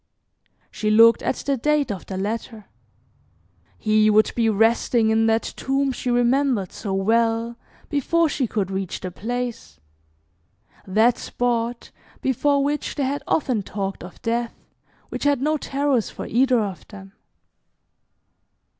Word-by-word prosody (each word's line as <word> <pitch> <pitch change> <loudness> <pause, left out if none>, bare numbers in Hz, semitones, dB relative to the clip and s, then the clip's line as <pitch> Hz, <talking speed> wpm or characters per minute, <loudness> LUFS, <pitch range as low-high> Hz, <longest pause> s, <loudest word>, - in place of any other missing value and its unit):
She 215 - -2
looked 230 +2 +6
at - - -1
the 275 -1 -2
date 295 0 +1
of 195 - -7
the 190 - -5
letter. 215 +2 -4 1.1
He 215 0 +3
would 215 +1 +4
be 230 -2 +2
resting 225 +1 +2
in 225 0 +3
that 225 0 +2
tomb 270 0 0
she 255 0 -4
remembered 245 -4 +1
so 200 - -6
well, 225 +4 +1 0.3
before 320 +3 +1
she 275 -4 -1
could 200 -3 -2
reach 190 -1 -4
the 185 - -5
place; 230 - -5 1.1
that 220 +5 +3
spot 240 -1 -2 0.3
before 280 +2 +1
which 295 +1 -2
they 285 - -1
had 280 +2 -2
often 255 -8 +1
talked 195 -1 -5
of 180 - -11
Death, 235 0 -1 0.5
which - - -5
had 285 -2 +3
no 305 +3 +1
terrors 275 -5 0
for - - -7
either 255 +1 +2
of 195 -6 -4
them. 195 -2 -12
230 Hz, 135 wpm, -23 LUFS, 215-265 Hz, 1.1 s, looked